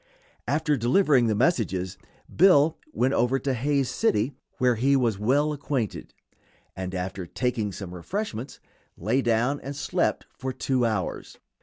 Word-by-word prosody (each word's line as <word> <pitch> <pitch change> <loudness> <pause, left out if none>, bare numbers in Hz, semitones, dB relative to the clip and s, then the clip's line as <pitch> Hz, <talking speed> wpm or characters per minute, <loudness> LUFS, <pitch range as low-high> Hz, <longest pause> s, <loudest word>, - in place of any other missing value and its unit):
After 150 +1 +1
delivering 130 - +3
the 110 - +1
message 120 - +2 0.6
Bill 160 -3 +5 0.2
went 135 - +1
over 125 +2 +2
to 135 0 -1
Hays 140 +2 +1
City, 130 - +1 0.2
where 125 -1 +3
he 130 +5 +2
was 115 -7 +1
well 145 +8 +2
acquainted, 135 -6 -3 0.6
and 95 0 -5
after 90 0 -4
taking 115 -1 -1
some 95 -2 -7
refreshments 135 - -5 0.4
lay 110 +10 +1
down 120 +4 +1
and 140 +1 -7
slept 145 - -1
for 130 - -4
two 125 -2 0
hours. 105 -5 -3
125 Hz, 140 wpm, -26 LUFS, 110-140 Hz, 0.6 s, Bill